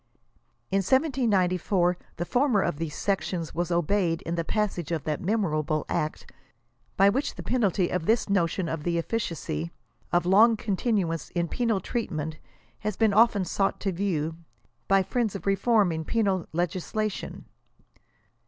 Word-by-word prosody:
In 195 - +3
1794 195 - +2 0.2
the 175 - -3
former 245 -1 +2
of - - -1
these 160 -3 -4
sections 185 -4 -2
was 175 0 -1
obeyed 170 0 +1
in 165 - -3
the 170 -1 -1
passage 185 -4 -2
of 160 -3 -1
that 150 -2 -2
memorable 155 -7 0
act 155 - -3 0.7
by 195 - +6
which 255 +8 0
the - - -7
penalty 200 -7 +1
of 180 -3 -2
•This 225 +4 +2
notion 185 -2 +1
of 165 -1 -3
the 170 +2 -1
efficacy 165 - -3 0.4
of 175 0 +2
long 215 +5 +6
continuance 195 -5 -1
in 170 0 +1
penal 230 +1 0
treatment 160 - -3 0.4
has 210 -2 -3
been 220 -3 +3
often 210 -3 +4
brought 195 -1 +1
to 195 - 0
view, 165 -4 -1 0.5
by 195 0 +4
friends 225 0 -1
of 195 - -6
reform 200 0 +3
in 160 0 -3
penal 195 -2 0
legislation. 185 +5 -3
185 Hz, 145 wpm, -27 LUFS, 165-215 Hz, 0.7 s, by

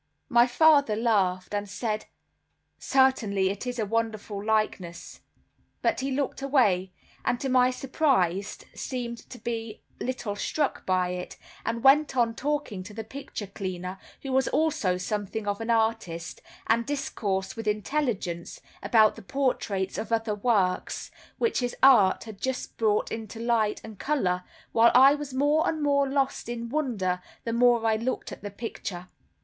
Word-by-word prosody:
My 240 +1 +5
father 285 -3 +5
laughed, 195 -5 +1
and 205 0 -2
said 215 +1 -3 0.7
"Certainly 220 -8 +2
it 200 +5 -6
is 250 0 -3
a 220 - 0
wonderful 215 -2 -2
likeness," 215 -5 -2 0.6
but - - +2
he 270 +1 -2
looked 275 0 -2
away, 210 -10 +2 0.3
and 245 - 0
to 270 - -2
my 255 -1 +5
surprise 250 - 0 0.2
seemed 240 -3 -5 0.2
but 230 -2 -3 0.3
little 245 -5 -3
struck 290 +7 -2
by 185 -1 +2
it, 180 0 -5 0.3
and 230 +1 -2
went 275 0 +5
on 230 -2 +3
talking 285 -7 -2
to 205 +2 -10
the 225 - -4
picture 225 -2 -7
cleaner, 185 -1 -5 0.2
who 270 - -4
was 265 0 +2
also 255 -13 +1
something 205 +3 -3
of 205 +1 -1
an 225 - -4
artist, 220 -7 0 0.2
and 230 +1 +2
discoursed 200 -9 -2
with 225 -1 -6
intelligence 210 - -2 0.2
about 220 -2 +4
the - - -10
portraits 205 -6 -1
or 220 - -4
other 225 -1 +1
works, 205 -4 0 0.3
which 465 - +1
his 245 -1 -2
art 225 -9 +6
had 220 -3 -11
just 260 -1 -3
brought 215 -2 +1
into 225 0 -6
light 230 -3 +1
and 220 -3 -10
color, 185 -12 0 0.3
while 230 +1 +6
I 270 +3 +8
was 290 -1 -5
more 290 +4 +2
and 315 - -2
more 280 -1 +2
lost 270 -3 -1
in 235 -1 -4
wonder 220 -11 -1 0.2
the 230 - -2
more 240 -1 +4
I 220 -1 +3
looked 240 +4 -3
at - - -9
the 205 - -5
picture. 200 -4 -6
225 Hz, 155 wpm, -27 LUFS, 200-260 Hz, 0.7 s, I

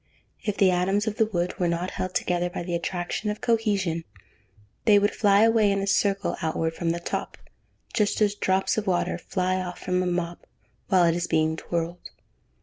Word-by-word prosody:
If 210 -2 -2
the 190 -2 +5
atoms 190 +4 +1
of 215 -1 -3
the 220 -2 +3
wood 175 -4 -2
were 180 - +2
not 170 +2 -1
held 185 0 -4
together 175 0 0
by 175 -1 -5
the 175 0 -4
attraction 175 +4 -2
of 210 - -3
cohesion, 205 -8 0 0.8
they 210 -2 +7
would 205 +1 +2
fly 205 0 +4
away 225 -2 +4
in 200 - +1
a 195 - -1
circle 200 0 +1
outward 160 0 -1
from 165 0 -2
the 170 +1 -1
top, 170 - -4 0.6
just 210 -1 +1
as 210 -2 +3
drops 190 +1 +1
of 210 - -7
water 180 -2 0
fly 185 0 -1
off 180 -1 -6
from 180 0 -1
a 185 - -1
mop, 175 -1 -3 0.4
while 185 -3 +4
it 170 -1 +4
is 175 0 -2
being 160 0 +1
twirled. 170 +1 -4
185 Hz, 195 wpm, -25 LUFS, 175-205 Hz, 0.8 s, they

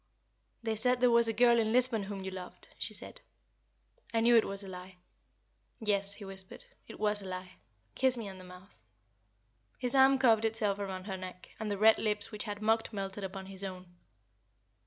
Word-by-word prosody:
"They 225 -1 -1
said 250 +3 +2
there 250 -1 +4
was 235 0 +5
a - - +2
girl 235 +1 +4
in 220 -1 +1
Lisbon 245 -2 +2
whom 195 -1 -6
you 190 - -5
loved," 185 -1 -8
she - - -2
said. - - -8 0.9
"I 230 - +1
knew 235 +1 +5
it 225 - +5
was 200 0 -4
a - - -9
lie." 185 0 -9 0.8
"Yes," 200 -3 +3
he 205 - -10
whispered, 195 - -1 0.2
"it - - -11
was 210 -1 +2
a 195 - -8
lie. 185 0 -7 0.4
Kiss 260 -1 +3
me 225 -3 -5
on 190 -1 -9
the - - -11
mouth." 180 +2 -14 1.0
His 250 0 0
arm 270 0 +6
curved 230 -4 +4
itself 215 -3 0
around 190 -2 -4
her 190 -1 -5
neck, 185 -1 -9
and 220 -1 -3
the 205 - -2
red 220 +2 +6
lips 210 -1 0
which 210 0 -4
had 205 0 -5
mocked 225 +1 +1
melted 195 -1 -5
upon 190 0 -6
his 195 0 -6
own. 185 -2 -8
205 Hz, 200 wpm, -31 LUFS, 190-225 Hz, 1.0 s, arm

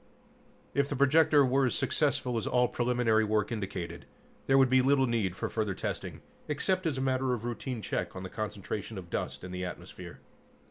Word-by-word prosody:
If 140 0 +1
the 145 - -2
projector 145 +1 +5
were 130 +1 +3
as - - -1
successful 145 -4 0
as 115 - -1
all 125 0 +3
preliminary 120 -3 +2
work 105 +1 0
indicated, 95 -6 -5 0.4
there 135 - +5
would 135 -1 +6
be 130 +1 +4
little 135 0 +4
need 110 -7 0
for - - -3
further 105 -4 -2
testing - - -4 0.3
except 185 +5 0
as 145 -4 -1
a - - -1
matter 130 -1 +1
of 115 -1 -7
routine 120 0 -4
check 85 0 -3
on 95 - -6
the - - -4
concentration 105 0 -4
of 90 -2 -9
dust - - -3
in 90 - -7
the 90 0 -4
atmosphere. 90 0 -8
120 Hz, 190 wpm, -30 LUFS, 100-135 Hz, 0.4 s, would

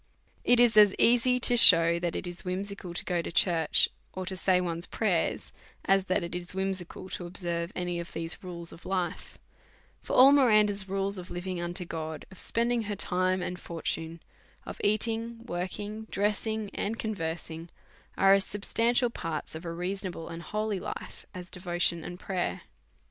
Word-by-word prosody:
It 245 0 +4
is 235 -2 +5
as 205 -2 +7
easy 245 +1 +4
to 245 - +5
shew 170 -7 +7
that 175 -1 -2
it - - -3
is 175 0 -4
whimsical 185 -1 -5
to - - -3
go 175 -2 0
to - - -6
church, 170 -2 +3 0.3
or 185 0 -5
to 190 +1 -3
say 185 0 +2
one's 170 -1 -3
prayers, 190 -7 -1 0.3
as 195 -1 +3
that 185 0 0
it 170 - -5
is 175 +1 -3
whimsical 190 -2 -3
to 175 - -5
observe 170 -1 -3
any 175 -1 -2
of 170 - -7
these 165 +4 -4
rules 170 -2 0
of 165 - -14
life; 185 -2 -3 0.6
for - - -6
all 265 +2 +9
Miranda's 210 -8 +4
rules 195 0 -1
of 180 - -9
living 180 0 -4
unto 175 +1 -3
God, 160 -2 -5
of 190 - -11
spending 235 +1 +1
her 205 0 -3
time 185 0 +1
and 180 0 -4
for 170 -1 -8
tune, 165 0 -3 0.4
of - - -8
eating, 230 +2 +1
working, 205 +3 -5
dressing, 210 +1 -1
and 220 +3 -2
conversing, 165 -5 -4 0.5
are 195 0 +6
as 195 0 +4
substantial 230 +5 +1
parts 160 -8 -4
of 160 +2 -8
a 170 - -3
reasonable 180 0 -4
and 165 0 -7
holy 210 +1 -2
life - - -7
as 180 -1 -7
de 180 - -9
votion 175 -2 0
and 175 0 -8
prayer. 185 -3 -3
185 Hz, 175 wpm, -29 LUFS, 175-210 Hz, 0.6 s, all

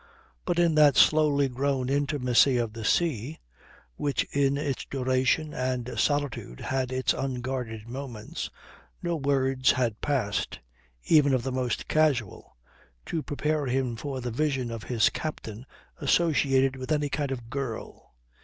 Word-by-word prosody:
But 175 -1 0
in 170 -2 +4
that 150 -2 +6
slowly 150 -3 +5
grown 130 0 -1
intimacy 135 -2 +3
of 115 -3 -1
the 115 0 -7
sea, 145 +1 0 0.6
which 145 -1 0
in 140 0 +2
its 145 -3 -2
duration 130 +3 0
and 125 -1 -2
solitude 145 - -1
had 130 -1 -2
its 130 0 +1
unguarded 125 -4 -4
moments, 125 -3 -6 0.5
no 170 -1 0
words 135 -3 +2
had 120 -4 -1
passed, 105 -9 -1 0.5
even 145 - +5
of 125 - -1
the 130 - -2
most 125 -3 -2
casual, 140 - 0 0.5
to 165 - -2
prepare 150 0 -1
him 125 -1 0
for 135 +2 -5
the 125 0 -3
vision 135 -2 -1
of 115 -1 -6
his 115 -3 +2
captain 120 -6 -6 0.3
associated 135 -4 +2
with 130 +3 -6
any 150 -1 +1
kind 145 0 -2
of 120 -3 -6
girl. 120 - -6
135 Hz, 140 wpm, -27 LUFS, 125-145 Hz, 0.6 s, that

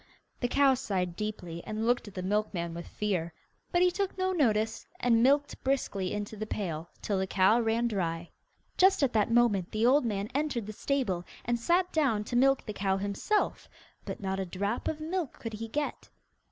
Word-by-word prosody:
The 245 - +1
cow 275 +1 +4
sighed 185 -8 -2
deeply, 180 -5 -5
and 215 +1 -3
looked 240 -1 +1
at 205 - -11
the 185 - -3
milkman 190 -4 -1
with 170 0 -7
fear, 175 -6 -2 0.4
but 350 0 +4
he 360 - +4
took 390 +1 -2
no 375 0 +1
notice, 220 -10 +1
and 230 -2 +3
milked 285 +3 +2
briskly 230 -8 0
into 205 +1 -4
the 215 +1 -5
pail, 170 -6 -3
till 200 -2 0
the 190 - -1
cow 190 +5 +4
ran 230 +1 +1
dry. 170 -6 -2 0.5
Just 380 -4 +5
at 260 - +2
that 215 -1 +2
moment 230 -6 +3
the 215 +2 +1
old 275 +4 +5
man 205 -3 -1
entered 275 -6 -1
the 215 - -6
stable, 215 -8 -1 0.2
and 240 0 0
sat 355 +8 +2
down 270 -10 +2
to 240 - -5
milk 270 +2 +4
the 215 - -4
cow 195 -1 0
himself, 205 - -1 0.3
but - - -6
not 190 -1 -2
a - - 0
drop 200 +6 -2
of 315 - -2
milk 325 -2 -2
could 225 -1 -6
he 225 +1 -5
get. 290 +6 -3
220 Hz, 195 wpm, -30 LUFS, 195-270 Hz, 0.5 s, Just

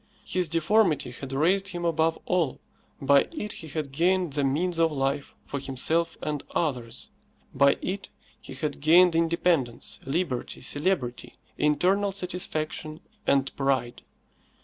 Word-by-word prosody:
His 180 -2 0
deformity 165 - +2
had 130 +2 -8
raised 180 +8 +2
him 175 -2 -4
above 160 0 +2
all. 170 -7 0 0.4
By 140 0 +4
it 210 -11 -5
he 160 - -9
had 150 -2 -4
gained 175 +2 +1
the 145 0 0
means 165 +6 0
of 165 -1 +4
life 140 0 -2
for 140 - -4
himself 140 +5 -1
and 150 -2 -2
others; 135 - -2 0.4
by 140 0 +4
it 195 +1 -3 0.3
he 135 - -10
had 150 +1 -3
gained 170 +3 +6
independence, 165 -7 +1
liberty, 135 -2 -2
celebrity, 145 -3 -2 0.2
internal 185 +7 +2
satisfaction 160 -4 -3 0.3
and 135 -1 +2
pride. 130 -3 0
155 Hz, 130 wpm, -27 LUFS, 140-180 Hz, 0.4 s, gained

